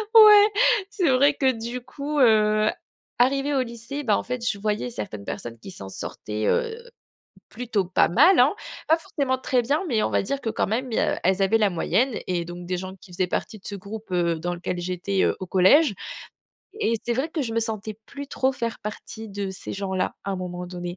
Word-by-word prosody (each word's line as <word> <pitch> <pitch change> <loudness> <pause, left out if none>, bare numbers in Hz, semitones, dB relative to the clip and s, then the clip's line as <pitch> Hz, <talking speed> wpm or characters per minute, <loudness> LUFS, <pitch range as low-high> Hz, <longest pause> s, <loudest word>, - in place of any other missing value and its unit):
ouais, 420 -2 +10 0.4
c'est 395 -6 +1
vrai 275 +3 +5
que 265 -2 +3
du 235 +1 -5
coup, 290 +4 -4
heu, 215 -3 +4 0.5
arrivée 275 +3 +2
au 265 - +3
lycée, 235 +4 -6
ben 215 -6 +3
en - - -1
fait, 245 -1 -4
je 200 - 0
voyais 210 - -1
certaines 105 -3 -6
personnes 115 +2 -6
qui 155 - -10
s'en 95 - -8
sortaient, 105 +2 -4
heu, 460 -2 +1 0.7
plutôt 225 -5 -2
pas 185 - +3
mal, 305 - +6
hein. 255 +4 +5 0.3
Pas 320 - +5
forcément 275 -5 -2
très 255 -1 +1
bien 285 +8 0
mais 225 -6 +1
on - - 0
va - - +2
dire 275 +8 -2
que 225 - -2
quand 215 - 0
même, 240 +5 -2
il - - -1
y - - +3
a - - 0
elles 190 +2 +2
avaient 195 +3 +4
la 210 -2 +3
moyenne 230 +8 0
et 175 -2 -1
donc 175 +1 -8
des 180 0 -1
gens 185 +1 -6
qui 185 - -15
faisaient 180 +1 0
partie 215 - -3
de - - -25
ce 200 - -4
groupe, 200 +1 -9
heu, 170 -2 +1
dans 175 +2 -2
lequel 175 +1 -4
j'étais, 185 +2 -1
heu, - - +2
au 185 - -6
collège. 205 - +5 0.9
Et 230 - +2
c'est 240 - 0
vrai 265 +6 -1
que 320 -2 -2
je 230 -4 -3
me 230 - +2
sentais 220 -1 -3
plus 280 0 -8
trop 265 -1 +1
faire 235 -3 -3
partie 220 +1 -7
de 200 -1 -4
ces 190 - -7
gens-là, 190 -2 -2
à 200 - -2
un 190 - -2
moment 180 -1 -5
donné. 175 0 -6
215 Hz, 225 wpm, -24 LUFS, 185-260 Hz, 0.9 s, ouais